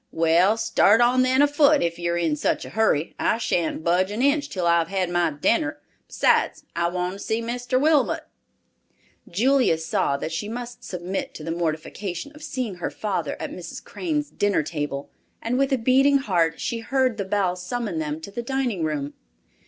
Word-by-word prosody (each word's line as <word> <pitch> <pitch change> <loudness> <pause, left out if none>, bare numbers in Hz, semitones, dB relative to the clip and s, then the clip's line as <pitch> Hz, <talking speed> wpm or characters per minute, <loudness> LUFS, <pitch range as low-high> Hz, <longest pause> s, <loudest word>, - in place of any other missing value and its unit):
Well, 170 +6 +3
start 225 -1 +4
on 245 +2 +4
then 260 +2 +4
afoot, 290 0 +4
if 170 0 -2
you're 170 0 -1
in 165 -3 +1
such 150 - -1
a - - -9
hurry. 205 -8 +1
I - - +2
shan't 170 -8 -1
budge 180 +3 +2
an 215 +5 -2
inch 285 +1 +2
till 185 -3 -3
I've 170 -1 +3
had 185 -2 -1
my 175 -1 +2
dinner; 300 - 0 0.3
besides, - - +2
I 170 0 +1
want 180 +1 -2
to 195 - -9
see 220 +2 -1
Mr. 245 +2 -1
Wilmot." 300 0 +2 1.1
Julia 250 -1 +3
saw 160 -3 0
that 155 - -4
she 175 +6 -3
must 245 +1 -7
submit 180 +1 -4
to 155 - -8
the 165 - -3
mortification 175 - -3
of 300 - -14
seeing 255 - -4
her 175 - -3
father 205 -3 -3
at - - -5
Mrs. - - -8
Crane's 300 -4 -3
dinner 205 -5 +1
table, 145 -2 -4 0.3
and 245 +3 -1
with 275 0 +2
a 270 - +3
beating 265 +4 +4
heart 170 -10 0
she 230 - -2
heard 255 0 0
the 200 - -1
bell 190 -2 0
summon 200 -1 -3
them 150 0 -3
to 200 - -8
the 240 - -4
dining 245 -7 -1
room. 145 -2 -2
200 Hz, 185 wpm, -24 LUFS, 170-255 Hz, 1.1 s, start